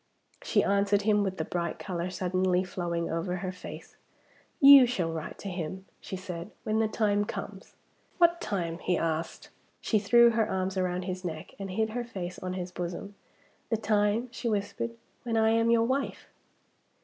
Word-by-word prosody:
She - - +2
answered 200 0 +2
him, 210 0 +3
with 190 -2 -2
the 160 - -2
bright 170 -2 -2
color 180 -2 -3
suddenly 185 0 +1
flowing 170 -2 -3
over 165 +2 -2
her 185 0 -3
face. 185 - -10 0.6
"You 275 -2 +10
shall 180 -9 -1
write 160 -1 -6
to - - -8
him," 185 +1 -5
she - - -6
said, 180 -1 -6
"when 220 0 0
the 220 - +3
time 205 -1 +1
comes." - - -7 0.4
"What 340 -1 +4
time?" 170 -5 -2
he 180 -1 0
asked. 165 0 -3 0.3
She 215 - +1
threw 235 +3 +6
her 225 -1 +1
arms 190 0 -1
round 180 -1 -1
his 185 0 -4
neck, 160 -3 -6
and 195 -1 -5
hid 220 +4 -1
her 245 +2 -2
face 180 -6 -6
on 185 0 -4
his 180 -1 -5
bosom. 180 +3 -5 0.6
"The 225 - +1
time," 210 +2 +1
she 240 -1 -3
whispered, 225 +3 -2 0.3
"when 230 -2 -1
I 220 0 +4
am 230 0 +3
your 230 -1 +4
wife." 265 +3 -2
195 Hz, 175 wpm, -29 LUFS, 180-220 Hz, 0.6 s, You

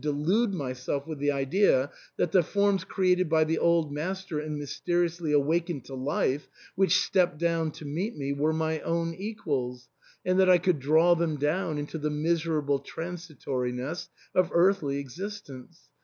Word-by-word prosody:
359 150 0 -2
delude 215 +3 +3
myself 135 0 -3
with 155 -3 -6
the 145 +1 +1
idea 140 0 +2 0.3
that 165 - +1
the 185 - +5
forms, 200 +2 +1
created 185 -2 +1
by 160 -1 +4
the 160 +1 0
old 170 -3 +2
master 185 +2 -3
and 150 0 -4
mysteriously 170 +3 -1
awakened 150 0 +1
to 135 - -10
life, 135 +1 -1 0.3
which 195 +1 +3
stepped 175 -5 +2
down 165 -1 +1
to 155 - -10
meet 175 +11 -3
me, 140 -1 -2
were 150 +3 +1
my 160 0 -1
own 165 +1 -1
equals, 140 - -4 0.4
and 185 +1 +2
that 190 -1 +5
I 180 - +8
could 175 -3 +1
draw 160 +6 +5
them 170 -2 0
down 155 +2 0
into 150 +2 -4
the 150 0 -1
miserable 150 -2 0
transitoriness 155 -5 -4 0.2
of 185 -1 +3
earthly 170 -6 +3
existence. 140 - -8
160 Hz, 160 wpm, -28 LUFS, 145-175 Hz, 0.4 s, I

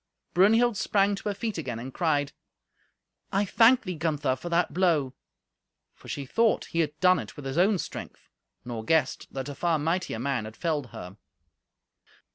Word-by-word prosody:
Brunhild 225 +5 +4
sprang 200 +1 +2
to 200 +1 -3
her 200 - -2
feet 215 -3 -3
again, 125 -7 -4
and 125 +3 -7
cried, 145 -4 0 1.0
"I 200 +1 +1
thank 235 +5 +5
thee, 185 -3 -4
Gunther, 150 -5 0
for 175 - -7
that 170 +1 +1
blow." 165 -8 +2 0.8
For - - -17
she 140 - -4
thought 225 - +2
he 165 - -3
had 155 -2 -1
done 185 0 +5
it - - -8
with 145 - -9
his 135 +5 -1
own 195 +3 +4
strength, - - -7 0.4
nor 115 -2 -5
guessed 155 +1 0
that 135 0 -5
a 145 - -5
far 165 +3 +1
mightier 165 -2 -1
man 125 -2 -1
had 110 +1 -10
felled 155 -6 -1
her. 95 -3 -10
160 Hz, 175 wpm, -27 LUFS, 135-190 Hz, 1.0 s, thank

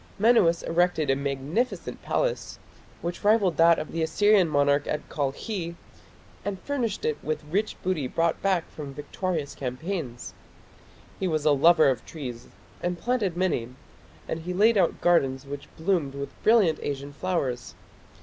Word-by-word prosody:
Menuas 195 -7 +4
erected 165 -4 +1
a - - +3
magnificent 140 - -2
palace, - - -1 0.5
which 175 +3 -4
rivalled 205 -5 +3
that 165 0 +6
of 155 - -5
the 165 - -2
Assyrian 205 +3 +4
monarch 145 -1 +2
at 150 - -3
Kalkhi, 165 - -3 0.7
and 200 -2 -3
furnished 250 -8 -2
it 150 -1 0
with 155 0 -2
the 150 - -18
rich 205 +4 0
booty 180 -8 0
brought 165 +4 0
back 190 -4 +1
from 140 -3 -8
victorious 155 0 -3
campaigns. 130 0 -5 0.9
He 190 - 0
was 155 -3 -1
a 150 - +5
lover 155 +2 +6
of 130 -4 +1
trees 125 -7 -7 0.3
and 175 0 -1
planted 210 -6 -1
many, 175 -11 0 0.6
and 160 - -3
he 180 +2 -5
laid 220 +4 +5
out 185 -5 +2
gardens 135 -6 +2
which 140 0 -7
bloomed 160 -5 0
with 140 0 -5
brilliant 210 -9 +4
Asian 140 0 -4
flowers. 140 -8 -2
165 Hz, 150 wpm, -26 LUFS, 145-190 Hz, 0.9 s, that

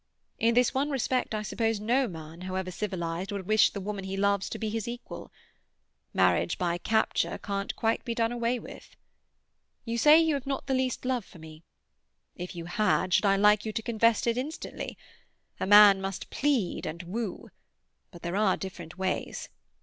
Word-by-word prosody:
In 230 +1 +3
this 245 0 +3
one 275 +3 0
respect 255 -4 -1
I 215 - -2
suppose 225 0 -1
no 245 +5 +1
man, 160 -1 -9
however 185 0 -3
civilized, 180 -2 -3
would 200 -2 -4
wish 215 +2 +5
the 200 - -6
woman 200 0 -4
he 190 0 -4
loves 200 0 +1
to - - -5
be 220 - -3
his 225 0 -3
equal. 240 +1 -7 0.8
Marriage - - +2
by 175 -1 -1
capture 220 +4 0
can't 200 -1 -4
quite 225 0 0
be 235 -2 -3
done 230 0 +1
away 240 +1 0
with. - - -12 0.9
You 230 0 -2
say 300 +5 +8
you 325 -1 +2
have 275 -1 -3
not 275 -1 -2
the 270 - -1
least 260 -1 -1
love 250 -3 0
for 185 - -16
me; 160 -1 -12 0.7
if 180 +2 -7
you 170 -1 -6
had, 185 0 +1
should - - +4
I 195 - +4
like 210 +1 +4
you 220 - -3
to 225 0 -3
confess 230 -1 +2
it 235 +1 +1
instantly? 300 +5 -6 0.6
A - - -2
man 205 -1 +8
must 195 -1 -5
plead 270 -10 0
and 170 +3 -6
woo; 200 +3 -5 0.6
but 175 -3 -14
there 175 +2 -3
are 200 -2 +2
different 175 -3 -8
ways. 190 0 -3
210 Hz, 185 wpm, -28 LUFS, 185-235 Hz, 0.9 s, say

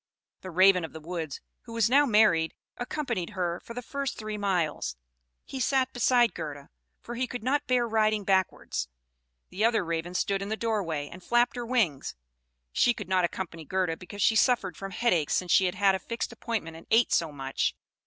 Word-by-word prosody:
The 185 - -7
Raven 185 +1 +5
of 160 - -6
the 160 - -7
woods, 160 -3 -5 0.2
who 230 - -9
was 230 -2 +3
now 280 +4 +5
married, 210 -8 +4 0.2
accompanied 245 - -3
her 175 -1 -1
for 230 - -11
the 245 - -5
first 280 +1 -3
three 215 -1 -5
miles. 190 - -1 0.5
He 270 - -6
sat 260 0 +1
beside 245 -1 +3
Gerda, 150 -4 -7 0.3
for 240 - -6
he 250 +2 -1
could 245 -2 -6
not 285 +4 0
bear 245 -2 +2
riding 215 -1 +2
backwards; 190 - 0 0.6
the 205 - -2
other 225 -4 +3
Raven 170 +2 -3
stood 195 +1 0
in 200 - -4
the 220 - -2
doorway, 185 -11 -1
and 180 +4 -11
flapped 240 +4 +2
her 240 -1 -4
wings; 205 - 0 0.6
she 240 - +3
could 205 -4 -7
not 185 -1 +3
accompany 170 -2 -5
Gerda, 180 0 -1
because 190 +3 -5
she 225 - +4
suffered 220 -5 +2
from 195 - -6
headache 180 -7 +1
since 180 -1 0
she 190 - +5
had 180 0 -1
had 200 0 +4
a 190 - -1
fixed 230 +5 -4
appointment 165 -9 -4
and 165 - -14
ate 225 +2 +4
so 165 -2 +2
much. 135 -2 -2
195 Hz, 195 wpm, -28 LUFS, 170-235 Hz, 0.6 s, Raven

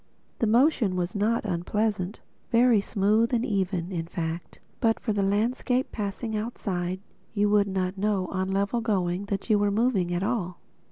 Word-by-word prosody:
The 230 - +2
motion 235 - +3
was 180 0 -2
not 215 +3 +1
unpleasant, 200 +2 -1 0.3
very 235 -2 +5
smooth 215 +5 +2
and 235 +1 0
even; 190 -3 -1
in 165 -2 -3
fact, 170 -1 -5 0.2
but 225 -1 +2
for 220 - -1
the 205 - 0
landscape 235 +6 0
passing 215 +1 -3
outside, 190 -5 -3 0.4
you 205 0 +2
would 205 -1 +4
not 190 0 -2
know, 200 -2 +1
on 190 -1 -1
the 190 - -2
level 200 +4 0
going, 190 -4 0
that 200 -1 -3
you 210 - +5
were 205 0 +2
moving 200 -4 +1
at 175 +1 -1
all. 200 -5 -2
200 Hz, 170 wpm, -27 LUFS, 185-225 Hz, 0.4 s, very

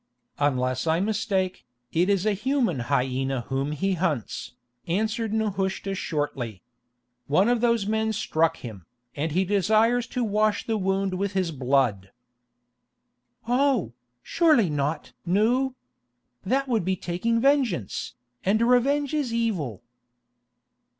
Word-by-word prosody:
"Unless 130 -1 0
I 160 +1 +2
mistake, 200 -2 -1 0.3
it 175 +4 +2
is 200 -1 +2
a 215 - +3
human 235 - 0
hyena 130 -1 0
whom 135 +2 -1
he 190 +6 0
hunts," 160 - -2 0.3
answered 220 +5 -1
Nehushta 195 -3 -1
shortly. 135 - -3 0.6
"One 185 +9 +3
of 240 -1 +2
those 235 -4 +2
men 220 +1 0
struck 165 -6 0
him, 105 -8 -9 0.3
and 150 +2 -2
he 185 +3 +2
desires 220 +5 +2
to 250 +1 -2
wash 215 -1 +1
the 225 - 0
wound 195 0 0
with 200 +2 -2
his 185 -3 0
blood." 125 -8 +1 1.4
"Oh, 245 - +2 0.3
surely 305 - +3
not! 145 +2 -2
Nou. 235 +9 +1 0.7
That 270 +7 0
would 230 -6 +1
be 190 +2 0
taking 185 +7 -1
vengeance, 255 - 0 0.3
and 200 +3 +2
revenge 265 +5 +2
is 290 -6 0
evil." 185 - -2
195 Hz, 125 wpm, -25 LUFS, 150-230 Hz, 1.4 s, a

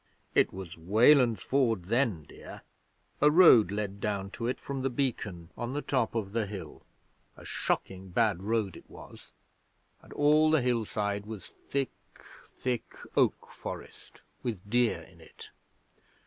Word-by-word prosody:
'It - - +3
was 90 -3 -8
Weland's 115 - +4
Ford 120 -8 +1
then, 115 - +1
dear. - - -12 0.6
A 150 - +7
road 150 - +7
led 100 -1 -3
down 100 -2 -2
to 115 - -4
it 125 - -2
from 140 -1 -5
the 135 - 0
Beacon 105 -10 -3
on 120 +1 -4
the 145 - -2
top 125 -4 0
of 105 -3 -2
the 115 -2 0
hill 100 -2 -8 0.6
a - - -13
shocking 95 0 -3
bad 105 -2 +1
road 105 -3 -1
it - - -14
was - - -13 0.7
and - - -18
all 150 +2 +4
the 155 -4 +3
hillside 105 -4 -1
was 110 -3 -7
thick, 135 -1 -4 0.6
thick 125 -3 -4 0.2
oak - - +2
forest, - - -9 0.2
with 105 -5 -5
deer 120 +1 +2
in - - -18
it. - - -13
115 Hz, 150 wpm, -29 LUFS, 100-130 Hz, 0.7 s, A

